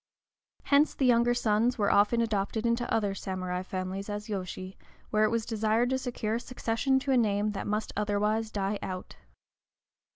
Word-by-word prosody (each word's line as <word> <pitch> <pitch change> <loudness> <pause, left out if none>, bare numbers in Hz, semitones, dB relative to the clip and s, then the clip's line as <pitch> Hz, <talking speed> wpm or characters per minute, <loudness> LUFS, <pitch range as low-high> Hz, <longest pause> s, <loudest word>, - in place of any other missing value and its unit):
Hence 285 +2 +3
the 270 - +1
younger 240 0 +4
sons 230 +1 +2
were 205 -2 +2
often 210 +4 +4
adopted 220 0 -1
into 235 +1 0
other 205 -3 +1
samurai 185 -2 -3
families 185 +1 -4
as 210 +1 -5
yōshi, 185 -1 -5 0.4
where 215 0 +4
it - - +2
was 230 0 -1
desired 225 +2 +1
to 260 - +1
secure 235 -4 -3
a 230 - 0
succession 250 +2 0
to 270 - -1
a 260 - +4
name 210 -2 +2
that 200 - -5
must 210 +1 -2
otherwise 210 +2 0
die 200 -1 -2
out. 185 -1 -6
215 Hz, 170 wpm, -29 LUFS, 200-235 Hz, 0.4 s, younger